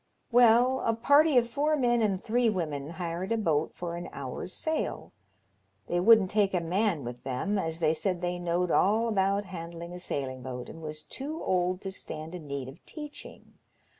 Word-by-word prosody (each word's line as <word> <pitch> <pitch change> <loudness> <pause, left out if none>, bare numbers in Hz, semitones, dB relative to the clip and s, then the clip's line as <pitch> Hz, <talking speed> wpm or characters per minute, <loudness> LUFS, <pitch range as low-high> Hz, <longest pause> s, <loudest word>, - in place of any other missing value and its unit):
*'Well, 245 +2 +5
a 225 - +1
party 285 +4 +5
of 240 -1 +4
four 295 +6 +1
men 240 -3 +2
and 200 -4 +1
three 235 +3 +2
women 155 -8 -3
hired 175 +3 -4
a 230 - +2
boat 160 -7 0
for 170 -1 -4
an 175 +1 -6
hour's 140 +6 -6
sail. 315 - -3 0.7
They 175 - 0
wouldn't 210 0 +6
take 205 -2 +2
a - - +3
man 175 -1 0
with 120 0 -7
them, 135 +11 -1
as 160 -3 -2
they 160 -2 +2
said 180 +2 -1
they 175 0 -2
knowed 175 0 0
all 220 +4 +3
about 200 -1 +1
handling 170 -1 -7
a 180 - -7
sailing 130 -6 -3
boat, 125 -1 -6
and 165 - -10
was 155 -1 -6
too 300 +4 -6
old 180 0 +1
to 190 - -5
stand 160 -3 -7
in 170 -4 -8
need 140 -2 -4
of 135 +6 -12
teaching. 300 -2 -10
180 Hz, 190 wpm, -29 LUFS, 165-225 Hz, 0.7 s, wouldn't